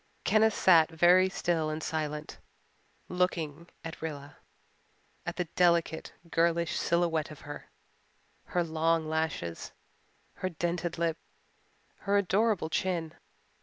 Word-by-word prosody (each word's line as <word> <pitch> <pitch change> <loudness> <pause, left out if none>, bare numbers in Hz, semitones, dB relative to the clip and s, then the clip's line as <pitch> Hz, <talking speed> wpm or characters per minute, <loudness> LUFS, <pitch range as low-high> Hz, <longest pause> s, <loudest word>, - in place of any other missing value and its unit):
Kenneth 220 0 +4
sat 165 -4 +6
very 175 +3 +5
still 170 -4 0
and 155 +1 -4
silent, 150 -1 -3 0.7
looking 170 -3 -1 0.2
at 165 - -7
Rilla 145 -3 -6 0.9
at - - -2
the 180 - -1
delicate, 170 -2 +2 0.2
girlish 170 0 +2
silhouette 170 -2 +1
of 150 - -11
her, 145 0 -9 0.8
her 175 - 0
long 165 0 +1
lashes, 160 - -3 0.6
her 185 - -2
dented 170 0 -2
lip, 165 -1 0 0.8
her 200 0 +1
adorable 200 -3 +1
chin. 170 -4 -1
165 Hz, 110 wpm, -30 LUFS, 160-175 Hz, 0.9 s, sat